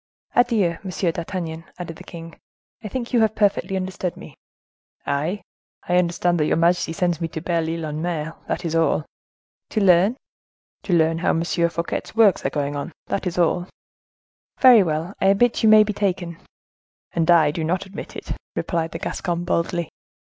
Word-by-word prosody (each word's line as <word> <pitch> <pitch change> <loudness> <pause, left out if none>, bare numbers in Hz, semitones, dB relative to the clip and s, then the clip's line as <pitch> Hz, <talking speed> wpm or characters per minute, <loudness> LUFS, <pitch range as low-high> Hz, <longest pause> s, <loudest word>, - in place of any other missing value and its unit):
"Adieu! 220 -9 +2
Monsieur 185 -2 -1
d'Artagnan," 165 -1 -5
added 165 -2 -7
the - - -11
king; 165 -1 -10 0.5
"I - - -4
think 240 +3 -5
you 240 - +4
have 220 -1 +2
perfectly 200 -2 +1
understood 185 -1 -3
me." - - -11 0.7
"I? 165 +8 -1 0.4
I 180 - +2
understand 175 0 +1
that 150 - +2
your - - +2
majesty 170 0 +2
sends 175 0 -1
me 165 - 0
to 160 - -6
Belle 165 -1 -1
Ile 165 -1 -3
en 150 0 -4
Mer, 165 -2 -3
that 180 - -3
is 165 - -2
all." 165 -2 +2 0.6
"To 220 - -1
learn?" 195 +4 +4 0.7
"To 185 - 0
learn 165 -1 +3
how 175 - +1
M. 165 - +1
Fouquet's 170 +1 -2
works 220 -5 +4
are - - +1
going 145 -1 -2
on; 145 +4 -4
that 195 - -2
is 175 - -4
all." 175 +1 +1 0.9
"Very 250 -4 +8
well: 165 +1 -2
I 195 - +3
admit 215 +5 +3
you 220 - +5
may 215 0 +8
be 210 0 -3
taken." 180 -4 -2 0.7
"And 165 0 0
I 160 -4 +6
do 160 +2 -3
not 180 +4 -1
admit 195 0 -9
it," - - -7 0.2
replied 165 -2 -2
the - - -3
Gascon, 175 -2 -3
boldly. 170 -2 -1
175 Hz, 180 wpm, -22 LUFS, 165-195 Hz, 0.9 s, Very